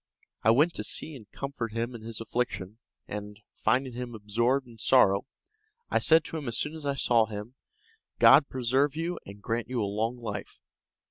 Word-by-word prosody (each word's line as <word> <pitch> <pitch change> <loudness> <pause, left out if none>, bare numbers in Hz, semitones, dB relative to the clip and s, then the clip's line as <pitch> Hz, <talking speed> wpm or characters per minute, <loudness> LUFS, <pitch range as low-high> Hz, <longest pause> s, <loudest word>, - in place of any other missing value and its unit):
I 110 - +3
went 150 +9 +4
to - - -4
see 155 - -4
and 110 -6 -13
comfort 130 -5 -5
him 115 +2 -2
in 115 - -8
his 115 -1 -6
affliction, 115 -3 -3 0.3
and, 105 0 -6 0.2
finding 125 +3 +1
him 120 -1 -6
absorbed 115 +6 0
in 115 -2 -15
sorrow, 100 -4 +4 0.6
I - - +3
said 160 0 +5
to 165 - -5
him 145 -4 -6
as 115 - -2
soon 150 - -1
as 155 -3 -6
I 140 - 0
saw 115 -4 +3
him, 105 +3 -7 0.6
"God 140 +1 +7
preserve 130 +3 +1
you 170 +2 -2
and 100 +1 -11
grant 115 0 -2
you 125 -1 -1
a 105 - +1
long 110 +4 -1
life." 105 -4 -6
120 Hz, 190 wpm, -28 LUFS, 110-135 Hz, 0.6 s, God